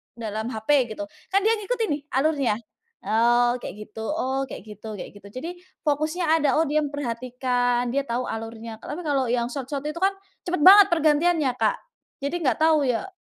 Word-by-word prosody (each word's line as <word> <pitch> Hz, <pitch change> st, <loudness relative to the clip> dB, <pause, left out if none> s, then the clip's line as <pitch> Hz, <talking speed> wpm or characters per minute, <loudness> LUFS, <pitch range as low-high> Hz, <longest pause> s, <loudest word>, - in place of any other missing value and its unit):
dalam 220 Hz, -1 st, -4 dB
HP 220 Hz, +1 st, -7 dB, 0.3 s
gitu. 305 Hz, -, -4 dB, 0.2 s
Kan 395 Hz, +1 st, +1 dB
dia 440 Hz, -, +4 dB
ngikutin 455 Hz, +2 st, -1 dB
nih, 290 Hz, 0 st, -1 dB
alurnya, 275 Hz, -5 st, +2 dB, 0.5 s
"Oh, 240 Hz, +2 st, +3 dB
kayak -, -, -6 dB
gitu 220 Hz, +1 st, -9 dB
oh 270 Hz, +1 st, -1 dB
kayak -, -, -7 dB
gitu," 210 Hz, +1 st, -10 dB
kayak -, -, -8 dB
gitu. 200 Hz, 0 st, -13 dB
Jadi, 325 Hz, +6 st, -4 dB, 0.4 s
fokusnya 310 Hz, +4 st, 0 dB
ada, 285 Hz, -1 st, +2 dB
"Oh, 325 Hz, -, +3 dB
dia 305 Hz, +1 st, +2 dB
memperhatikan, 245 Hz, -2 st, -1 dB
dia 280 Hz, 0 st, +1 dB
tau 245 Hz, +2 st, -1 dB
alurnya." 225 Hz, 0 st, -6 dB
Tapi, 300 Hz, +4 st, -5 dB
kalau 275 Hz, -3 st, +1 dB
yang 240 Hz, -1 st, +1 dB
short 265 Hz, -2 st, -5 dB
short 285 Hz, 0 st, -3 dB
itu 320 Hz, +3 st, -4 dB
kan, 385 Hz, +1 st, +4 dB, 0.3 s
cepet 355 Hz, -2 st, -2 dB
banget 400 Hz, +1 st, +10 dB
pergantiannya, 315 Hz, -2 st, +3 dB
Kak. -, -, +1 dB, 0.5 s
Jadi, 285 Hz, +5 st, -1 dB
nggak 255 Hz, -5 st, +2 dB
tahu 315 Hz, -2 st, +4 dB
ya, 250 Hz, +10 st, -1 dB
270 Hz, 180 wpm, -24 LUFS, 235-310 Hz, 0.5 s, banget